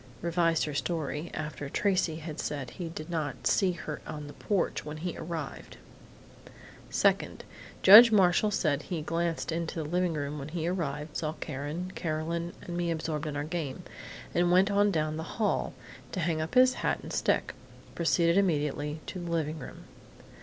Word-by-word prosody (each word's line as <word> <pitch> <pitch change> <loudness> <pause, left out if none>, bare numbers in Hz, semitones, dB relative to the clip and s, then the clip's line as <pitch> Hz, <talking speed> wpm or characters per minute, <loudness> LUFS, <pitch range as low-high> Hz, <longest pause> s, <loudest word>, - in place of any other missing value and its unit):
(Revised 170 -1 +2
her 150 - -4
story 155 +1 -2
after 150 -2 -5
Tracey 185 -2 +1
had 155 -1 -7
said 135 -5 -3
he 175 -3 -5
did 155 -1 -7
not 155 -6 -3
see 190 -3 +3
her 155 -3 -6
on 150 -2 -6
the 145 - -9
porch 200 -4 -1
when 150 +1 -6
he 170 +2 -4
arrived.) 160 -3 -6 1.1
"Second: - - +1 0.4
Judge 225 +4 +11
Marshall 195 0 +4
said 155 -8 +1
he 165 -2 -4
glanced 165 +1 -1
into 165 0 -2
the 160 -3 -3
living 180 +1 +1
room 145 0 -3
when 140 - -6
he 165 +1 -3
arrived, 150 -4 -3
saw 155 -1 -2
Karen, 150 +5 -5
Carolyn 165 +2 -2
and 175 - -6
me 175 -1 -1
absorbed 160 -2 -2
in 150 - -4
our 145 - -1
game, 155 -4 -4 0.5
and 175 0 +3
went 190 +3 +5
on 205 +1 +4
down 155 -4 0
the 160 0 -6
hall, 215 -2 +1 0.4
to 185 - -2
hang 160 -2 0
up 160 +9 -4
his 255 0 +7
hat - - 0
and - - -7
stick. - - +1 0.4
Proceeded 170 +1 +3
immediately 150 -4 0
to 185 - -6
the 175 -1 -5
living 160 -2 -1
room. 125 - -9
165 Hz, 175 wpm, -29 LUFS, 150-175 Hz, 1.1 s, Judge